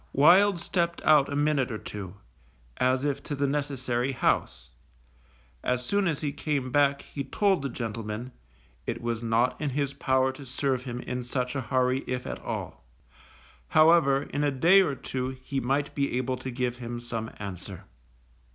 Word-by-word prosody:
Wild 180 +6 +6
stepped 170 0 -1
out 150 -2 +5
a - - -2
minute 145 -3 +1
or 110 - -3
two, 100 -3 -7 0.6
as 130 +2 +2
if 140 -1 -1
to 145 - -4
the 140 0 0
necessary 135 -3 -1
house; 65 - 0 0.9
as 125 0 0
soon 200 +3 +1
as 155 -4 -1
he 145 -2 -1
came 140 -4 -2
back 140 0 +3
he 140 - -5
told 195 +6 +1
the 140 - -2
gentleman, 115 0 -5 0.6
it - - -2
was 120 -1 -2
not 115 +4 +1
in 150 - 0
his 140 0 -1
power 130 -1 +2
to 130 +2 -11
serve 130 0 -1
him 125 -1 -4
in 125 0 -4
such 125 +1 -2
a 140 - 0
hurry, 130 +2 +1
if 125 0 -3
at - - -5
all; - - -5 0.8
however, 155 -3 +5
in 145 0 -3
a 145 - +3
day 170 +9 +6
or 145 -7 0
two 130 0 -4
he 140 -2 -2
might 135 +3 0
be 140 -3 0
able 130 0 -1
to 130 +1 -6
give 125 -1 -2
him 120 -1 -5
some 115 -2 -4
answer. 95 -2 -7
130 Hz, 175 wpm, -27 LUFS, 125-145 Hz, 0.9 s, Wild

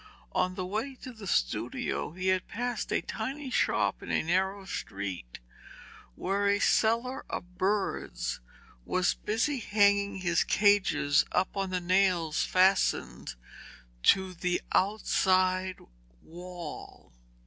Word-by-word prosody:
On 185 0 0
the 185 - -3
way 220 +8 -3
to 255 - -7
the 220 -4 -10
studio - - -1
he 185 +1 -1
had 185 -1 +1
passed 245 +1 -3
a - - +1
tiny 265 +5 -5
shop - - +1
in - - -9
a - - +1
narrow 190 +4 0
street 95 - -5 0.8
where 200 +2 0
a 200 0 +3
seller 235 +6 +2
of 180 0 -7
birds 200 +1 -1 0.4
was 185 - +1
busy 245 +6 -1
hanging 200 -2 +3
his 175 -3 +1
cages 195 -8 +3
up 185 +3 0
on 195 -1 -1
the 185 0 -1
nails 180 -3 +2
fastened 185 - +2 0.7
to 190 - +3
the 180 0 -1
outside 185 -2 +2 0.5
wall. 175 - -9
190 Hz, 120 wpm, -29 LUFS, 180-205 Hz, 0.8 s, a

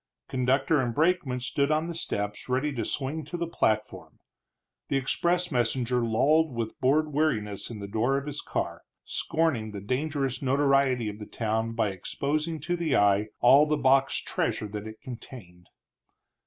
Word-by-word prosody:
Conductor 135 +3 +2
and 120 -2 -2
brakeman 155 -5 +1
stood 140 +3 0
on 155 +1 +1
the 170 - -4
steps 105 -9 -4
ready 135 +4 0
to 120 -4 -2
swing 145 +7 -3
to 175 +4 -5
the 170 - -1
platform; 110 -10 -1 0.7
the 140 - +1
express 175 +7 0
messenger 125 0 +1
lolled 145 +6 +2
with 115 -1 -4
bored 150 +3 +2
weariness 110 -10 0
in 115 - -7
the 100 -1 -6
door 115 +7 +1
of 140 - -4
his 145 0 -4
car, - - -3 0.2
scorning 155 -10 0
the 100 - -5
dangerous 135 +4 -2
notoriety 135 -3 +2
of 105 0 -5
the 105 - -8
town 110 0 -1
by 110 -2 +1
exposing 150 - -2
to 175 +4 -1
the 170 -4 0
eye 105 +1 +3
all 140 +5 +7
the 150 0 +1
boxed 135 -1 +2
treasure 105 - -1
that 105 +1 -6
it 110 0 -10
contained. 115 -9 -10
130 Hz, 165 wpm, -27 LUFS, 110-150 Hz, 0.7 s, all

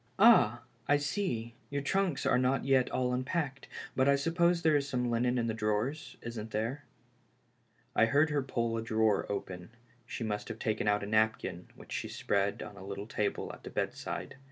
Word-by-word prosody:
Ah, 120 - +6 0.2
I 145 - +5
see, 140 - -2 0.2
your 140 -1 -2
trunks 190 -2 0
are - - +4
not 130 +1 +1
yet 135 -2 +3
all 125 -1 0
unpacked, 135 +1 -2 0.3
but 130 +1 +3
I 140 - +6
suppose 170 +4 +2
there 160 -2 +4
is 140 -1 +1
some 125 -2 0
linen 125 +2 +1
in 120 - +1
the 115 - -1
drawers 115 +8 -1
— - - -34
isn't 115 -2 -5
there? 115 +7 -3 0.5
" - - -39
I 115 - +6
heard 145 +6 +3
her 145 -1 +1
pull 115 -3 -1
a - - -1
drawer 110 -2 +1
open; 95 -2 -5 0.4
she 120 - -4
must 105 -2 -3
have - - -5
taken 110 -1 -1
out 105 0 +2
a - - -2
napkin 110 +1 0
which - - -14
she - - -2
spread 100 0 -1
on - - -9
the 100 - -12
little 100 +1 -6
table 105 -1 -2
at - - -12
the - - -8
bedside. - - -4
125 Hz, 200 wpm, -31 LUFS, 110-140 Hz, 0.5 s, Ah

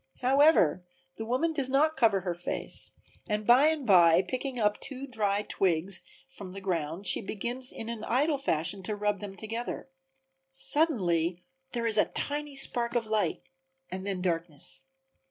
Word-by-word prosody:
However 260 - +4 0.3
the 225 - -5
woman 260 +8 0
does 275 -4 +1
not 305 +4 +3
cover 220 -7 +3
her 180 -1 -2
face 175 +1 -5 0.4
and 210 -2 -1
by 250 +6 +6
and 315 -4 0
by, 175 -4 +6
picking 255 +6 -4
up 210 -1 +1
two 275 -1 -5
dry 210 -5 -1
twigs 185 -2 0 0.3
from 200 -9 -9
the 195 - -7
ground, 175 -1 -3
she - - +4
begins 240 +6 -3
in 225 - -7
an 230 -2 -5
idle 285 +4 +1
fashion 190 - 0
to 210 +3 -3
rub 205 -1 -1
them 200 -1 -7
together. 230 +4 -5 0.6
Suddenly 185 - +1 0.3
there 235 -2 -2
is 220 -2 +4
a - - +5
tiny 290 0 -3
spark 240 -3 0
of 235 -2 +1
light 215 -1 -1 0.5
and 185 +1 -5
then 190 -2 -3
darkness. 170 - -3
215 Hz, 160 wpm, -29 LUFS, 185-265 Hz, 0.6 s, by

